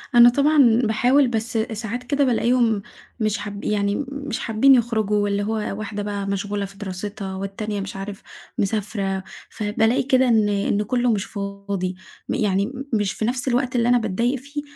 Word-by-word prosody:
أنا 240 0 +9
طبعًا 275 -3 +4
باحاول، 250 +5 +3
بس 225 -1 -2
ساعات 220 +2 -3
كده 280 +2 +1
بالاقيهم 235 -3 +2 0.4
مش 215 -2 0
حاب 205 0 -6
يعني 205 +5 0
مش 280 -4 -4
حابين 235 +5 +4
يخرجوا، 215 -4 +1
اللي 200 0 0
هو 220 +2 -1 0.2
واحدة 205 -1 -4
بقى 200 -1 -3
مشغولة 200 +1 -2
في 195 0 -12
دراستها، 195 0 -5
والتانية 200 +1 -4
مش 195 - -6
عارف 195 +1 -6 0.4
مسافرة، 195 -2 -1 0.3
فبالاقي 220 +3 +1
كده 260 0 +3
إن 220 -3 +3
إن 200 +1 0
كله 245 +2 +1
مش 200 -3 0
فاضي. 200 -2 -4 0.3
م - - 0
يعني 200 +2 +1 0.2
مش 205 -2 +1
في 215 - -2
نفس 245 +2 -1
الوقت 255 0 0
اللي 235 0 +2
أنا 245 - +5
باتضايق 235 +4 0
فيه، 285 +3 -6
215 Hz, 165 wpm, -22 LUFS, 200-245 Hz, 0.4 s, أنا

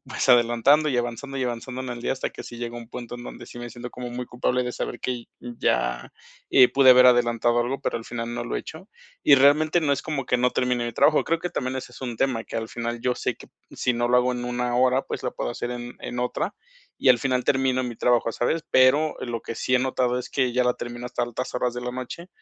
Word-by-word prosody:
pues, - - -3
adelantando 120 +5 +5
y 125 - 0
avanzando, 120 +3 -4
y 130 - 0
avanzando 125 +1 -4
en 130 - -5
el 120 -1 -6
día - - 0
hasta 130 - -3
que - - -10
si 120 - -10
llega 120 0 -5
un 120 -1 -9
punto 120 -1 -7
en 120 - -8
donde 120 - -9
sí 120 - -11
me 120 -1 -7
siento 120 +1 -8
como 125 -1 -7
muy 125 +1 -5
culpable 125 +1 0
de 125 - -3
saber - - -5
que 125 -2 -3 0.2
ya, - - -1 0.4
eh, 130 -2 +7
pude 135 -1 +6
haber 125 0 +8
adelantado 120 -1 +3
algo, 125 +3 -2
pero, - - -2
al 115 - -7
final 115 0 -5
no 120 - -3
lo 120 - -3
he - - 0
hecho. 170 +6 -10 0.3
Y - - +7
realmente 150 +5 +4
no, 145 -3 +1
es 140 - -1
como 145 -5 -3
que 125 - +2
no 125 +1 +2
termine 125 -1 0
mi 120 - -3
trabajo, 155 +6 +4
creo 165 +1 +1
que 175 +2 -4
también 130 -5 -3
ese 125 -1 -7
es - - -13
un 125 -3 -4
tema 125 -2 0
que - - -6
al 110 0 -3
final 120 0 -4
yo 125 +1 0
sé - - -2
que - - -14 0.2
si 125 - 0
no 120 0 0
lo 125 - +4
hago 125 0 +3
en 125 0 -4
1, 125 0 -2
hora, 130 +1 +3
pues, - - -6
lo - - -2
puedo - - -3
hacer 120 - -4
en 120 0 -6
en 125 - -6
otra 125 +10 -2 0.4
y 135 - +2
al 125 -2 +7
final 130 -1 0
termino 130 -1 +2
mi 120 -3 -5
trabajo, 120 -1 +2
¿sabes? 155 +8 0
Pero, 145 +4 +4
lo 120 -2 -4
que - - -6
sí 125 - -1
he - - +5
notado 125 -1 0
es 125 - -6
que 130 -3 0
ya 125 0 +2
la 125 - +2
termino 120 0 -6
hasta 125 - -3
altas 120 +1 -4
horas 125 0 0
de 125 - -4
la 125 0 -4
noche, 130 +8 -7
125 Hz, 270 wpm, -24 LUFS, 120-130 Hz, 0.4 s, haber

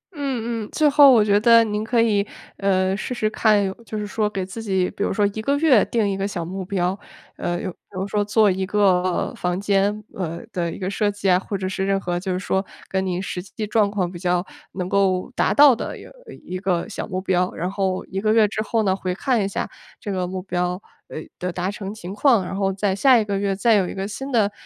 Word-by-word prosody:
嗯 240 -6 -3
嗯。 - - -13
最 305 -1 +3
后 285 -1 +8
我 225 -4 +6
觉 205 -1 +3
得 230 +1 +6
您 210 -1 -2
可 230 +1 +2
以， 210 -3 +2 0.3
呃， 190 -1 +1
试 215 +5 -4
试 215 -3 0
看 215 -1 +3
有 190 -1 -2
就 215 - -5
是 210 - -3
说 210 +1 -1
给 195 -3 -3
自 195 +5 -7
己 190 -4 0
比 - - -4
如 - - 0
说 205 +1 +2
1 220 - -4
个 280 +6 +1
月 285 -8 +5
定 225 -3 0
一 195 - -2
个 195 0 -1
小 175 -4 -4
目 190 +3 -5
标。 185 0 -1 0.4
呃， 175 0 -2
有 185 - -4
比 - - -20
如 190 0 -4
说 205 +1 0
做 210 0 +3
一 190 +1 -1
个 185 -3 +1
房 180 +1 -2
间， 205 +1 +1
呃， 170 -3 -4
的 170 -3 -1
一 - - -7
个 185 - -4
设 205 +1 0
计 205 -1 -3
啊， 180 0 +5
或 200 +1 -4
者 190 0 -3
是 190 0 -2
任 195 0 +1
何 175 -2 -2
就 190 +1 -4
是 180 - 0
说 190 +1 -1 0.2
跟 190 0 -1
你 180 -1 -2
实 180 -2 -4
际 205 +3 -6
状 210 -1 +2
况 190 -4 -1
比 175 - -8
较 180 0 0 0.3
能 180 -1 -3
够 190 +2 +1
达 - - +2
到 285 -3 +7
的， - - -4 0.4
呃， - - -9
一 185 +1 -5
个 185 -3 -1
小 220 - -5
目 185 -3 -3
标。 185 -1 0
然 175 +3 -2
后 190 -2 -1
1 190 +1 -4
个 215 0 +2
月 220 -2 +5
之 215 +1 -3
后 220 +1 0
呢， 190 -2 +2
回 185 -1 -3
看 245 -1 +1
一 195 - 0
下 200 - -3 0.3
这 205 - -5
个 185 -1 -1
目 185 0 -5
标， 180 -1 -2 0.3
呃， - - -7 0.2
的 180 0 -2
达 180 +2 -2
成 200 -1 -6
情 190 -3 -8
况， 220 -3 +3
然 185 - -5
后 195 -1 0
在 190 0 -1
下 260 +4 +5
一 220 - +1
个 200 -1 -1
月 200 -1 0
再 225 +4 +3
有 190 -4 +2
一 - - -7
个 195 0 -3
新 270 +7 -6
的， 215 -5 +2
195 Hz, 270 characters per minute, -22 LUFS, 185-215 Hz, 0.4 s, 后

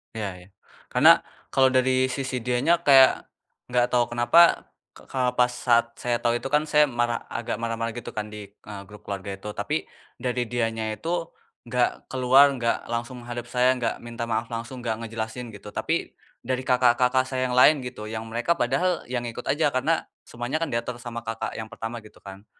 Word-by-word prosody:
Iya 110 -2 -2 0.2
iya. - - -20 0.5
Karena, - - +8 0.4
kalau 130 -1 +4
dari 130 0 +3
sisi 135 -2 -3
dianya, 125 +7 +2
kayak, 135 -2 +6 0.4
nggak 125 0 +3
tahu 120 -1 +1
kenapa, 165 +9 +5 0.2
ke - - -10 0.2
pas 125 0 +3
saat 120 -1 +1
saya 120 -1 -1
tahu 120 0 +2
itu 135 - -5
kan, 150 +1 +2
saya 150 0 +5
marah 120 -3 -1
agak 120 -2 -4
marah-marah, 115 0 -2
gitu - - -7
kan, 105 -1 -4
di, 105 -1 -8
eee, 100 -1 -10
grup 105 +2 -14
keluarga 100 0 -4
itu. 95 +2 -8
Tapi, - - -2 0.3
dari 125 -1 -1
dianya 115 -2 -2
itu 160 +10 -6 0.6
nggak 120 +1 0
keluar, 130 +2 +6
nggak 120 -3 -1
langsung 120 +1 -4
menghadap 120 0 -6
saya, 125 +1 +3
nggak 120 -3 -2
minta 115 0 -5
maaf 115 +1 0
langsung, 120 +2 -6
nggak 110 0 -2
ngejelasin, 115 +1 -5
gitu, 105 -1 -11
tapi, - - -2 0.3
dari 130 0 -1
kakak-kakak 125 0 +3
saya 130 -1 -1
yang 125 - -1
lain 145 +3 +7
gitu, 125 -3 -7
yang 110 +1 -5
mereka 120 +9 +1
padahal, 170 +5 0
ya, 125 - -1
ngikut 120 -1 -5
aja. 145 -2 +2
Karena, 155 +6 +1 0.2
semuanya 120 +7 -3
kan, 165 - -1
diatur 120 +1 -3
sama 115 -2 -7
kakak 115 0 -4
yang 110 - -4
pertama, 115 +1 -5
gitu - - -17
kan. 100 +1 -11
120 Hz, 185 wpm, -25 LUFS, 115-130 Hz, 0.6 s, Karena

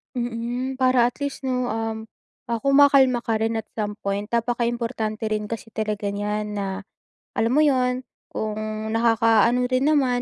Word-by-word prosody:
Mm, 245 +2 -3
para 255 -2 +4
at 245 - -5
least 280 - -3
no, 250 -1 0
um, 225 0 -3 0.5
ah, 230 - 0
kumakalma 275 -2 +5
ka 225 -1 0
rin 225 +1 0
at 220 - -2 0.2
some 210 0 -2
point. 200 +1 -2
Napakaimportante 235 -1 -1
rin 210 -1 -1
kasi 225 0 -6
talaga 210 -2 -2
nyan 210 +1 -2
na 195 -1 -4 0.5
alam 225 +1 +1
mo 305 - +5
yun, 255 -3 +2 0.2
kung 215 -1 -4 0.3
nakaka-ano 230 +1 +3
rin 255 +2 +2
naman, 260 -5 +2
230 Hz, 155 wpm, -23 LUFS, 215-250 Hz, 0.5 s, kumakalma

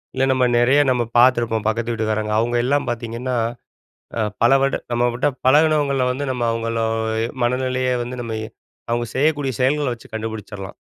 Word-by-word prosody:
இல்ல 130 - +1
நம்ம 130 -1 +2
நெறைய 130 +4 +4
நம்ம 125 -2 +2
பாத்துருப்போம் 120 -3 +3
பக்கத்து 115 +1 -1
வீட்டுக்காரங்க. 110 -1 -1
அவுங்க 120 +2 +1
எல்லாம் 140 +1 +1
பாத்தீங்கன்னா, 120 +2 -3 0.8
அ - - +1 0.2
பல 120 +3 +5
வருட 135 - +1 0.2
நம்ம 120 +1 +1
கிட்ட 125 - 0 0.2
பழகுனவங்கள 145 -2 +3
வந்து 140 +3 -2
நம்ம 125 -2 -2
அவுங்கள 115 0 -2 0.5
எ - - 0 0.2
மனநிலைய 130 +1 0
வந்து 125 +1 -6
நம்ம 115 -2 -5
எ 110 - -7 0.4
அவங்க 120 0 0
செய்யக்கூடிய 145 -1 +1
செயல்கள 145 +3 +2
வச்சு 115 - -16
கண்டுபுடிச்சிரலாம். 110 -3 -6
120 Hz, 160 wpm, -21 LUFS, 115-130 Hz, 0.8 s, பல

